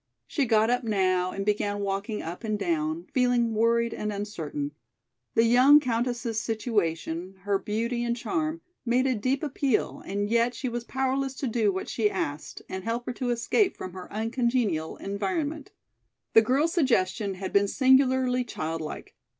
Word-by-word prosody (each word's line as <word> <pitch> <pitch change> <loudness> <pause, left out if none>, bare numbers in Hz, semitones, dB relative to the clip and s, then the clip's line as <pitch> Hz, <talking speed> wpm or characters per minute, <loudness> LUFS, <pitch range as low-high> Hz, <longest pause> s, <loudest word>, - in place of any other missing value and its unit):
She 280 - 0
got 220 0 +3
up 245 +1 +1
now 185 -4 +1
and 195 +1 -4
began 205 -1 0
walking 200 +2 -2
up 170 +7 -6
and 215 -2 -1
down, 165 -3 -1
feeling 245 -3 +2
worried 230 +1 +2
and 210 0 -3
uncertain. 165 -8 -4 0.6
The 225 - +5
young 255 +5 +7
countess's 240 -3 -1
situation, 190 -6 -2
her 200 0 0
beauty 230 +4 -2
and 235 0 -1
charm, 315 +3 -2 0.2
made 250 +2 +2
a 260 - +2
deep 255 +6 -1
appeal 275 -4 0
and 205 +1 -2
yet 235 +2 +2
she 260 - -3
was 240 0 -4
powerless 265 0 -1
to 270 - -3
do 220 -3 +2
what 190 0 -4
she 215 -3 +1
asked 150 -7 -4
and 190 0 -5
help 230 +2 -2
her - - -3
to 245 +1 -3
escape 240 - +1
from 185 - -7
her 185 -1 -9
uncongenial 225 -6 0
environment. 270 - -3 0.6
The 225 - +8
girl's 275 +9 +1
suggestion 210 - +1
had 190 0 -5
been 200 0 +4
singularly 260 0 +3
childlike. 160 -8 -5
225 Hz, 160 wpm, -27 LUFS, 195-250 Hz, 0.6 s, The